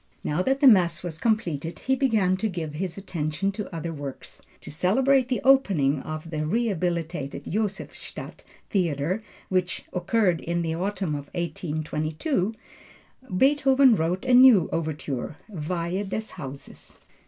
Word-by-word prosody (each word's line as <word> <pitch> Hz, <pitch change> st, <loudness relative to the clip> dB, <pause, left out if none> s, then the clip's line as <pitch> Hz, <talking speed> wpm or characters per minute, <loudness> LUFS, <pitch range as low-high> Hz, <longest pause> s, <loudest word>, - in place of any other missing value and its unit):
Now 150 Hz, +4 st, 0 dB
that 270 Hz, +7 st, 0 dB
the 280 Hz, -, +7 dB
Mass 175 Hz, -7 st, +5 dB
was 165 Hz, -2 st, -5 dB
completed 170 Hz, -, -1 dB
he 265 Hz, -, 0 dB
began 220 Hz, -9 st, +2 dB
to 220 Hz, +3 st, -1 dB
give 165 Hz, -5 st, -4 dB
his 175 Hz, +3 st, -4 dB
attention 185 Hz, 0 st, -2 dB
to 205 Hz, 0 st, -6 dB
other 165 Hz, 0 st, -4 dB
works. 140 Hz, -3 st, -8 dB, 0.2 s
To -, -, -9 dB
celebrate 255 Hz, -, +3 dB
the 250 Hz, -, 0 dB
opening 190 Hz, -, +4 dB
of 155 Hz, +3 st, -6 dB
the 155 Hz, -1 st, -2 dB
rehabilitated 175 Hz, -, -1 dB
Josephstadt 205 Hz, 0 st, -4 dB, 0.3 s
theatre 175 Hz, +1 st, 0 dB, 0.3 s
which 185 Hz, -1 st, -1 dB
occurred 180 Hz, -1 st, +1 dB
in 170 Hz, 0 st, -1 dB
the 160 Hz, -1 st, -1 dB
autumn 185 Hz, -1 st, -2 dB
of 145 Hz, -1 st, -5 dB
1822, 160 Hz, -, -2 dB, 0.8 s
Beethoven 270 Hz, -1 st, +5 dB
wrote 180 Hz, +6 st, -1 dB
a 255 Hz, -, +2 dB
new 245 Hz, -8 st, +7 dB
overture, 155 Hz, -3 st, -3 dB
Weihe 180 Hz, +1 st, -3 dB
des 220 Hz, +2 st, -4 dB
Hauses. 135 Hz, 0 st, -9 dB
180 Hz, 135 wpm, -25 LUFS, 155-220 Hz, 0.8 s, the